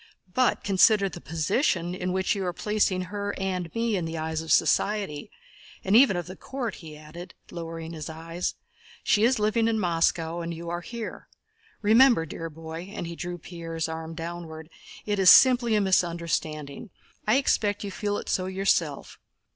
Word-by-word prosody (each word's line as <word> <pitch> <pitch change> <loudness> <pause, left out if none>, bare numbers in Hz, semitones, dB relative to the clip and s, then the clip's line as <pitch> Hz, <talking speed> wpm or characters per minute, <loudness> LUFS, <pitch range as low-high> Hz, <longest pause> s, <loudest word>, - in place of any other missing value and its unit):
But 255 +2 +2
consider 200 +1 +4
the 175 - -10
position 170 - 0
in 180 0 -3
which 190 +1 +1
you 195 - -3
are 175 - -2
placing 205 -1 0
her 205 +2 -4
and 185 -3 -3
me 230 -1 0
in 180 -3 -1
the 165 0 -4
eyes 160 0 -2
of 160 - -5
society, 180 -1 +1 0.5
and 190 +2 +2
even 235 -6 +6
of 175 - -3
the 185 - -9
court," 250 +2 -5
he 155 -3 -11
added, 170 +4 -11 0.2
lowering 165 -1 -6
his 155 -2 -6
voice. 165 +2 -4 0.5
"She 210 - +3
is 250 +2 +4
living 215 +2 +1
in 225 -1 +1
Moscow 170 -2 0
and 170 0 -4
you 170 +1 -6
are 175 0 -3
here. 230 +3 -7 0.6
Remember, 225 -3 +5
dear 165 +1 -6
boy," 165 +4 -8
and 205 - -5
he 170 0 -6
drew 175 +1 -5
Pierre's 165 -1 -5
arm 160 0 -6
downwards, 165 -1 -7 0.4
"it 205 -1 -1
is 190 -1 +7
simply 245 -2 +7
a 210 - +3
misunderstanding. 170 -2 -1 0.4
I 215 - +4
expect 210 -7 +1
you 200 - -5
feel 205 +1 -2
it - - -7
so 185 -1 0
yourself. 185 -6 -1
175 Hz, 175 wpm, -26 LUFS, 165-205 Hz, 0.6 s, is